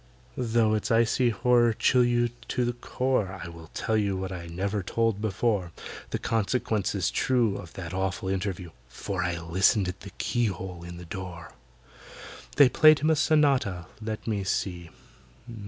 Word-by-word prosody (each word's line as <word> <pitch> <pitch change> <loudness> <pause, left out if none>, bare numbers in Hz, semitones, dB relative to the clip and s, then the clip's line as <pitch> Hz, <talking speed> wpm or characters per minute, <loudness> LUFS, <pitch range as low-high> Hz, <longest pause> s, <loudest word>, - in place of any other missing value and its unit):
Though 115 -3 +2
its 110 +2 -1
icy 115 +2 +3
horror 120 +1 +3
chill 125 +3 +3
you 120 0 +2 0.2
to 125 -1 0
the 120 - -1
core, 120 -6 -1
I 85 - -7
will 85 -1 -11
tell 110 - -1
you 100 -3 +1
what 95 0 -4
I 85 -2 -6
never 100 +5 -2
told 115 +2 0
before,— 105 -3 0 0.4
The - - -2
consequences 105 -3 0
true 120 -6 +1
Of 85 - -9
that 90 -3 -7
awful 95 0 -2
interview, 95 -2 -3 0.2
For 95 +8 -4
I 85 -1 -1
listened 95 +4 +2
at 90 +1 -5
the 100 - -10
keyhole 95 -7 -2
in 85 0 -8
the 90 - -9
door! 90 -1 -7 1.0
They 145 -2 +8
played 155 +4 +6
him 155 +2 +2
a - - +4
sonata—let 110 - 0
me 105 -3 -1
see! 90 -3 -2
100 Hz, 155 wpm, -27 LUFS, 90-120 Hz, 1.0 s, They